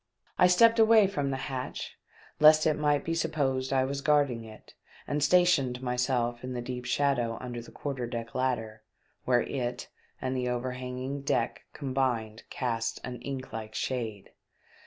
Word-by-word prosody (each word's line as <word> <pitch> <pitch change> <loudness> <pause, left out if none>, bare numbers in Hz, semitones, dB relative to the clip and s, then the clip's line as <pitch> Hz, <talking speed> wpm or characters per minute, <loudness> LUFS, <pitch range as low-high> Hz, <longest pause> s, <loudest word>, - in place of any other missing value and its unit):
I 180 - +7
stepped 230 +6 +5
away 220 -1 +7
from 145 -8 -1
the 135 - -1
hatch, 130 -2 -5 0.4
lest 155 0 +7
it 155 - +4
might 145 -1 +1
be 165 - -1
supposed 140 -5 -1
I 130 -1 +3
was 140 +1 -3
guarding 140 -5 +2
it, 110 -1 -13 0.3
and 145 0 -1
stationed 145 -7 +3
myself 125 -1 0
in 130 0 -4
the 125 - -3
deep 125 0 -5
shadow 120 -3 +1
under 120 -2 -6
the 115 - -13
quarter 135 -4 -4
deck 115 -1 -5
ladder, 115 -4 -2 0.4
where 125 -1 +3
it 125 -2 -4 0.3
and 130 0 -2
the 125 -1 -1
overhanging 125 +2 -4
deck 125 -4 -1
combined 130 -6 -1
cast 115 -3 -2
an 125 -2 -6
ink 135 0 -6
like 110 -1 -6
shade. 110 -6 -3
130 Hz, 155 wpm, -29 LUFS, 120-145 Hz, 0.4 s, I